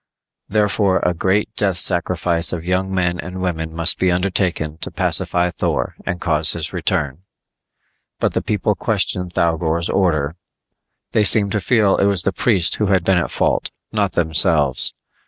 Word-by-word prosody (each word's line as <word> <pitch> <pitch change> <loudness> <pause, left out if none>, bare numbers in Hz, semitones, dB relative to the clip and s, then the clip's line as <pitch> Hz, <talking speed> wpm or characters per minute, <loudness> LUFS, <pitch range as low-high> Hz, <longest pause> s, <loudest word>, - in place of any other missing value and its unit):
Therefore 105 -2 +2
a 90 - +2
great 100 +5 0
death 95 -4 0
sacrifice 85 -1 0
of 85 -1 -5
young 95 +1 0
men 90 -2 0
and 90 +4 -6
women 80 -3 -3
must 85 +1 +1
be 95 -1 +2
undertaken 90 -4 -1
to - - -4
pacify 90 0 +1
Thor - - -2
and 95 -2 -2
cause 75 -2 +2
his - - -4
return. 70 0 -1 1.0
But - - 0
the - - 0
people 105 0 0
questioned 95 -4 -1
Thougor's 85 0 0
order; 80 -4 0 0.7
they 110 - +3
seemed 100 -1 +4
to 105 - -1
feel 105 0 +3
it - - +2
was 100 -3 +1
the 100 - 0
priest 95 -9 +1
who 105 - 0
had 95 -2 +2
been 95 0 +3
at 85 - -2
fault, - - 0 0.2
not 100 -3 0
themselves. 80 -4 +2
90 Hz, 160 wpm, -19 LUFS, 85-100 Hz, 1.0 s, seemed